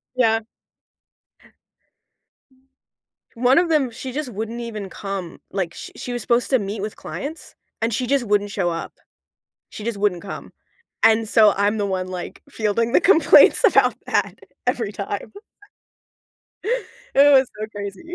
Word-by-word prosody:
Yeah. 225 -3 +3 3.0
One 250 +3 +3
of 345 +1 +4
them, 300 -6 +1
she 255 +2 -7
just 295 -1 -3
wouldn't 225 +2 -5
even 215 -4 -6
come. 195 -3 -6
Like, 185 -4 -2
sh - - -8
she 245 - -5
was 240 - -3
supposed 240 0 +1
to 260 - +4
meet 200 +1 -4
with 210 +1 -5
clients, 310 +4 -7 0.3
and 225 +1 0
she 250 +3 -1
just 275 -1 +2
wouldn't 205 -1 +1
show 190 -4 0
up. 165 -1 -5 0.8
She - - -9
just 220 -2 -3
wouldn't 200 -4 0
come. 200 - -8 0.5
And 220 0 +4
so 215 -2 +6
I'm 205 +2 +1
the 205 - 0
one, 185 -1 -2
like, 180 -1 -7
fielding 230 -1 -1
the - - +5
complaints 340 +4 +6
about - - +4
that - - -1 0.3
every - - -1
time. - - -5 1.8
It 285 +1 +7
was 265 -1 +6
so 215 - -3
crazy. 205 - -7
220 Hz, 150 wpm, -22 LUFS, 200-255 Hz, 3.0 s, It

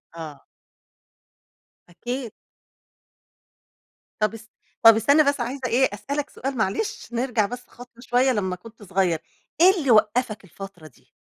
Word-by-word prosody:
آه. 155 -3 -9 1.4
أكيد. 240 +5 -5 1.9
طب 215 +1 +1
اس 225 0 -12 0.3
طب 225 -1 +10
استنى 280 +8 +4
بس 285 -2 +1
عايزة 260 +3 -4
إيه 250 +1 +3
أسألك 280 +8 -4
سؤال 270 0 -5
معلش، 420 - -2
نرجع 235 -3 +1
بس 245 +3 -8
خطوة 245 -1 -15
شوية 250 +1 +2
لمّا 190 -6 -1
كنت 220 +4 -15
صغيّر، 185 -4 0 0.4
إيه 370 - +9
اللي 275 -6 +1
وقّفك 215 0 +2
الفترة 190 -2 -11
دي؟ 135 - -23
230 Hz, 130 wpm, -24 LUFS, 200-260 Hz, 1.9 s, طب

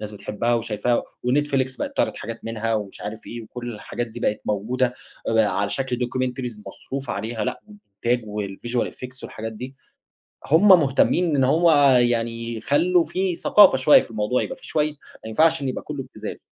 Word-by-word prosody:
الناس 105 0 -6
بتحبها 105 +4 -1
وشايفاها 115 +1 0 0.2
ونتفليكس 130 0 +1
بقيت - - -5
تعرض - - +1
حاجات 115 +2 -7
منها 115 0 -2
ومش 105 -2 -4
عارف 105 +2 -7
إيه، 120 -1 -7
وكُلّ 120 +2 -7
الحاجات 120 +3 -5
دي 110 - -9
بقت 105 - 0
موجودة 120 +5 0 0.3
على 100 -3 +2
شكل 130 -2 -1
documentaries 125 -2 -3
مصروف 135 +5 -6
عليها، 110 +1 -3
لأ، - - -3
والإنتاج 120 - -3
والvisual 105 +4 -3
effect 130 +1 -9
والحاجات 110 +1 -6
دي، 130 +5 -8 0.7
هُم 165 +8 +5
مهتمين 165 0 +4
إن 135 - +3
هو 165 +5 +4 0.3
يعني 115 -1 -1
يخلّوا 170 +9 +2
في 185 -2 -1
ثقافة 195 -10 +6
شوية 130 +3 +6
في - - -14
الموضوع، 110 +3 0
يبقى - - -5
في - - -14
شوية 155 -1 0
ما - - -21 0.3
ينفعش 160 +5 +3
إنّه 135 - -1
يبقى - - -5
كلّه - - -5
ابتذال. - - -8
120 Hz, 170 wpm, -23 LUFS, 110-135 Hz, 0.7 s, ثقافة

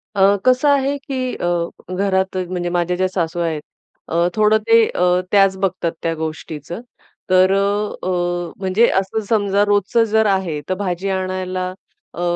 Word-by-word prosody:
अ, 200 +1 +5
कसं 255 +3 +4
आहे, 280 0 +2
की 260 -2 -4
अ, 175 - -3 0.5
घरात 190 -1 0
म्हणजे 175 -1 -2
माझ्या 175 0 0
ज्या 185 0 +1
सासू 175 -2 -2
आहेत, 160 -3 -1 0.5
अ, 170 +1 +1
थोडं 215 0 +4
ते 230 0 +6
अ, 180 - 0 0.3
त्याच 195 -2 +4
बघतात 185 -3 -1
त्या 165 - 0
गोष्टीचं. 160 - -6 0.5
तर 185 0 +5
अ, 200 +1 0
अ, - - 0 0.5
म्हणजे 195 +5 +3
असं 195 +3 -3
समजा, 205 -2 +2
रोजचं 205 +3 +2
जर 220 0 +3
आहे 190 -7 0
तर - - +2
भाजी 185 +1 -2
आणायला 185 -1 -2 0.5
अ, 175 - -5
190 Hz, 155 wpm, -19 LUFS, 180-210 Hz, 0.5 s, ते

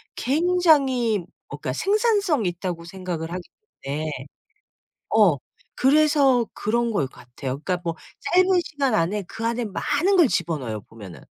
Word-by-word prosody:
굉장히 280 - +2 0.3
어 - - -7
그러니까 - - -4
생산성 405 - +1
있다고 175 -1 -3
생각을 175 -3 -5
하기 180 0 -6 0.4
때문에 150 +3 -3 1.0
어 205 -8 +5 0.4
그래서 280 -3 +4
그런 235 +2 0
것 145 -11 0
같아요. 130 +2 -7
그러니까 180 0 -1
뭐 165 -1 -1 0.3
짧은 365 +1 +3 0.2
시간 280 -6 -1
안에 200 +3 +1
그 225 - -7
안에 235 +1 0
많은 295 - +1
걸 340 -7 +6
집어 170 -6 0
넣어요 110 -5 -5
보면은. 105 -5 -12
220 Hz, 300 characters per minute, -23 LUFS, -, 1.0 s, 걸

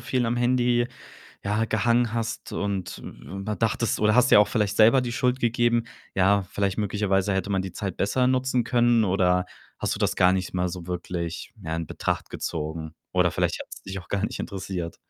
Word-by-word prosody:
viel 125 -1 0
am 120 +1 0
Handy, 120 0 +2 0.6
ja, 105 +3 +1
gehangen 115 +1 +2
hast 115 -1 -3
und 100 -3 -3
w - - -10 0.2
mal 105 - -2
dachtest 115 0 0
oder 105 0 +4
hast 125 0 +5
dir - - +9
auch 105 - +3
vielleicht 105 -3 0
selber 115 +4 +6
die 120 -2 -3
Schuld 125 +1 +1
gegeben: 120 0 +2 0.3
„Ja, 95 +1 +4
vielleicht 100 0 -1
möglicherweise 100 -1 +1
hätte 95 +1 -1
man 95 -1 +1
die 95 - -6
Zeit 100 -4 -4
besser 125 +6 +1
nutzen 130 -1 +1
können.“ 120 -1 +3
oder 90 -2 +2 0.3
hast - - -1
du - - -7
das - - +1
gar 90 0 +5
nicht 95 -1 -2
mal 90 0 +1
so 85 -1 -7
wirklich, 85 -1 -4
ja, 80 0 -3
in 85 - -3
Betracht - - -2
gezogen? 80 0 -4 0.2
Oder - - +3
vielleicht - - -1
hat's - - -9
dich 95 0 -6
auch 85 - -17
gar 100 +1 -1
nicht - - -3
interessiert. 95 -4 -5
105 Hz, 200 wpm, -25 LUFS, 95-120 Hz, 0.6 s, dir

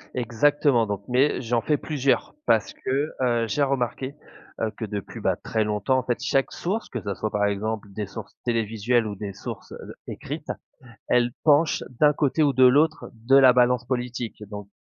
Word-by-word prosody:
Exactement, 125 0 +2
donc 100 -1 -4
mais 130 +3 +2
j'en 120 -1 0
fais 150 +4 +1
plusieurs 140 -3 0
parce 110 - +2
que, 140 +4 -2
heu, 120 -2 +1
j'ai 145 +7 -1
remarqué, 135 0 -2 0.4
heu, 110 -1 -1
que 110 - -3
depuis, 100 -2 -6
bah, - - +1
très 110 -1 -1
longtemps, 105 +5 +1
en - - -4
fait, 120 -2 -1
chaque 135 -1 +1
source, 205 +6 -3
que 120 - -5
ça 100 - -3
soit, 110 - -2
par 105 0 0
exemple, 105 +1 -2
des 105 -1 -4
sources 100 - -9
télévisuelles 115 0 0
ou 105 - -5
des 100 0 -6
sources, 100 - -8
heu - - -7
heu, - - -9
écrites, - - -6 0.6
elles 120 0 +3
penchent 155 +1 +4 0.2
d'un 150 -1 +6
côté 150 +2 +1
ou 145 -2 +3
de 130 0 +5
l'autre 150 +5 +4
de 115 +5 +3
la 130 -2 +8
balance 125 0 +3
politique 120 -3 -4
donc 105 -1 -8
120 Hz, 190 wpm, -24 LUFS, 110-135 Hz, 0.6 s, la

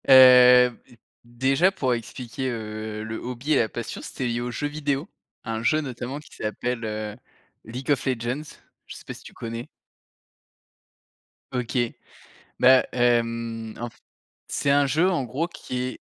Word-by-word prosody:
Heu, 125 -1 +9
b 120 - -20 0.3
déjà 135 +9 +2
pour 130 -9 0
expliquer, 120 +2 -4
heu, 110 -2 -5
le 110 0 -5
hobby 125 +5 -2
et - - +5
la 110 - +2
passion, 120 - -6
c'était 130 - -5
lié 120 0 -1
aux 120 - -3
jeux 145 - -2
vidéos, 145 +1 -2 0.4
un 115 -1 -3
jeu 155 +7 +2
notamment 130 0 -5
qui 150 - -16
s'appelle, 120 +3 -3
heu, 105 -1 -4 0.5
League 125 +5 -4
of 145 - +1
Legends, 125 +1 -1 0.5
je - - -9
sais - - -11
pas - - -6
si - - -14
tu - - -12
connais? 115 +1 -6 1.9
OK. 125 0 -2 0.8
Bah, 130 0 +7
hem, 115 -2 0
en 120 - -3
f - - -20 0.5
c'est 140 - -1
un 140 0 +4
jeu, 160 +7 +3
en 170 -8 0
gros, 140 +8 -2
qui 125 -6 -6
est 130 0 -5
125 Hz, 160 wpm, -25 LUFS, 115-135 Hz, 1.9 s, Heu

